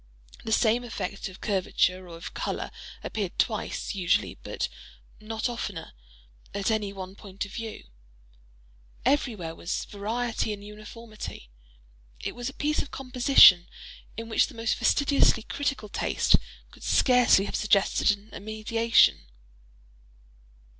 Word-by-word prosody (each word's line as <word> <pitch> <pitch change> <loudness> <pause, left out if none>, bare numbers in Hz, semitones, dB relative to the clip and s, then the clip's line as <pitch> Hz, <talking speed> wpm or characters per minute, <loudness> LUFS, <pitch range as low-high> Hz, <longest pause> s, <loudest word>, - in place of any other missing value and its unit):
The 220 - -4
same 225 +2 +3
effect 200 -5 -5
of 185 - -14
curvature 185 -2 0
or 165 - -9
of 165 - -8
color - - -3 0.3
appeared 200 -5 -4
twice, 215 -3 -1
usually, 185 -2 +1
but - - -3 0.5
not 220 +2 -3
oftener, 205 -8 -5 0.6
at 200 +2 0
any 210 -2 0
one 190 -1 -8
point 200 0 -7
of 200 - -12
view. 225 -1 -6 1.2
Everywhere 230 - 0
was 170 +2 -3
variety 220 +2 -2
in 205 -1 -9
uniformity. 210 - -9 0.7
It - - -4
was 245 +1 -4
a - - -10
piece 300 +1 0
of 280 - -7
"composition," 250 -9 +6 0.5
in 230 0 -5
which 225 - +3
the 270 - -13
most 225 0 0
fastidiously 280 -5 +3
critical 275 -6 -3
taste - - +2 0.4
could - - -17
scarcely 250 -6 +4
have 200 - -4
suggested 205 -2 +2
an 205 +1 -1
emendation. 220 - +2
215 Hz, 125 wpm, -27 LUFS, 195-235 Hz, 1.2 s, composition